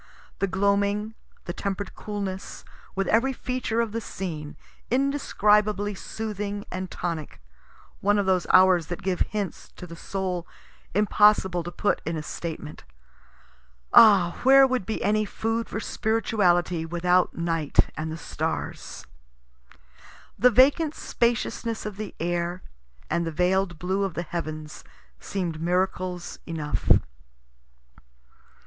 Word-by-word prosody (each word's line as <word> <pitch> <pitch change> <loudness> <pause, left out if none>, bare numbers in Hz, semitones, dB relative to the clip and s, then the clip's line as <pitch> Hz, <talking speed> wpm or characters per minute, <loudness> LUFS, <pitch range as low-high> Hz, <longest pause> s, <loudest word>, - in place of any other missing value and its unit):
The 195 - +1
gloaming, 200 +2 +1 0.3
the 175 - -4
temper'd 200 +2 -4
coolness, 200 -2 -6 0.3
with 195 0 0
every 255 +5 +3
feature 250 -2 -2
of 230 -2 -2
the 230 +1 -3
scene, 155 -8 -6 0.3
indescribably 210 -6 +2
soothing 205 0 -5
and 185 0 -4
tonic 165 -4 -5 0.6
one 205 +1 +2
of 200 - +1
those 185 -2 +1
hours 185 -3 +6
that 175 +2 -6
give 185 -1 -1
hints 205 -3 -3
to - - -9
the 170 -1 -10
soul, 180 -1 -3 0.5
impossible 205 -3 +4
to 175 +1 -6
put 205 - 0
in 165 +1 -3
a 155 - -4
statement. 155 -1 -6 1.1
(Ah, 195 -6 +7
where 270 +1 +7
would 255 -7 -1
be 220 - -2
any 215 +1 +2
food 225 +2 -2
for 210 - -3
spirituality 195 -7 +1
without 175 +2 +1
night 165 -3 +1
and 155 0 -4
the 160 - -5
stars?) - - -4 1.3
The 250 +5 +5
vacant 285 +6 +4
spaciousness 235 -1 -1
of 210 -2 -5
the 215 -2 -6
air, 175 +1 -2 0.5
and 170 - +1
the 165 - -3
veil'd 180 +1 +1
blue 185 +4 -1
of 195 -4 -3
the 170 - -2
heavens, 155 -2 -6 0.4
seem'd 170 -5 -4
miracles 180 0 -1
enough. 155 -3 -3
190 Hz, 125 wpm, -26 LUFS, 175-215 Hz, 1.3 s, Ah